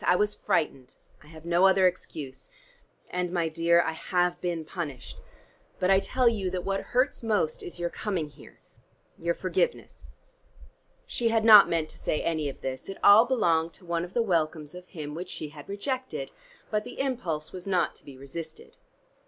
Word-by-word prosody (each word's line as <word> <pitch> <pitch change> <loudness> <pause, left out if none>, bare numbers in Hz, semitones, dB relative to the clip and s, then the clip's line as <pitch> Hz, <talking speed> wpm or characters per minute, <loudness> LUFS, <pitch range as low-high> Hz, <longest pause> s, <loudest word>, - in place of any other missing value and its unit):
I 180 - +4
was 210 +2 +1
frightened: 135 -5 -1 0.3
I 150 - -18
have 160 +1 -13
no 175 +2 +4
other 190 0 +4
excuse. 160 - -3 0.6
And, 180 -1 -2
my 170 -2 0
dear, 170 +1 +3
I 160 - -1
have 175 +2 -1
been 170 -3 -2
punished. 150 -7 -6 0.6
But 185 +1 +2
I 190 - +6
tell 255 +5 +1
you, 205 -5 +1
that 180 -1 -4
what 195 0 0
hurts 255 +3 0
most 210 -9 0
is 175 - -7
your 175 0 -2
coming 180 -8 -3
here 145 - -17 0.6
your 170 0 0
forgiveness." 470 - -2 1.0
She 240 - -1
had 225 -1 +2
not 215 -3 +10
meant 165 -2 0
to - - -14
say 150 - -1
any 155 -3 0
of 135 - -10
this; 130 +4 -5
it 195 - -6
all 210 +3 +8
belonged 170 -10 +1
to 180 - -12
one 170 -1 -1
of 175 +1 -9
the 235 - +3
welcomes 160 -5 -1
of 180 0 -11
him 150 -3 -7
which 180 +3 -6
she 150 - -6
had 145 +2 -12
rejected. 260 - -4 0.4
But 210 -1 0
the - - -10
impulse 185 - -2
was 185 0 -9
not 185 -2 +1
to - - -18
be 140 -2 -12
resisted. 155 +4 -9
175 Hz, 185 wpm, -27 LUFS, 160-200 Hz, 1.0 s, not